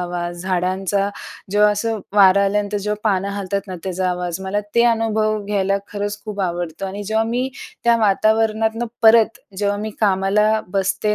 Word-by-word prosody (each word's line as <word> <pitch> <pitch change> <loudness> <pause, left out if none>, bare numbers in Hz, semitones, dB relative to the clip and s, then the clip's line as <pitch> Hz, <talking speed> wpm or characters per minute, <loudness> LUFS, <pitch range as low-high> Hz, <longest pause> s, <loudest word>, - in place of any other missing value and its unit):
आवाज, 175 -1 -4
झाडांचा 190 +2 0 0.4
जेव्हा 210 +1 +4
असं 220 +1 -2 0.2
वारा 200 0 +6
आल्यानंतर 205 +1 0
जेव्हा 210 +1 -3
पानं 195 0 0
हालतात 200 0 -2
ना 185 - -6
त्याचा 185 0 -1
आवाज, 180 0 -3
मला 195 +2 -2
ते 235 0 +5
अनुभव 215 -2 0
घ्यायला 195 -1 0 0.2
खरंच 205 0 -3
खूप 205 -2 -5
आवडतं 175 0 -3
आणि 200 +2 -5
जेव्हा 220 +2 +1
मी 245 +3 -1 0.4
त्या 235 0 +5
वातावरणातनं 220 +2 +1 0.2
परत 225 0 +5 0.2
जेव्हा 205 0 0
मी 215 +1 -4
कामाला 210 +2 +2
बसते 195 +2 0
205 Hz, 155 wpm, -20 LUFS, 190-215 Hz, 0.4 s, वारा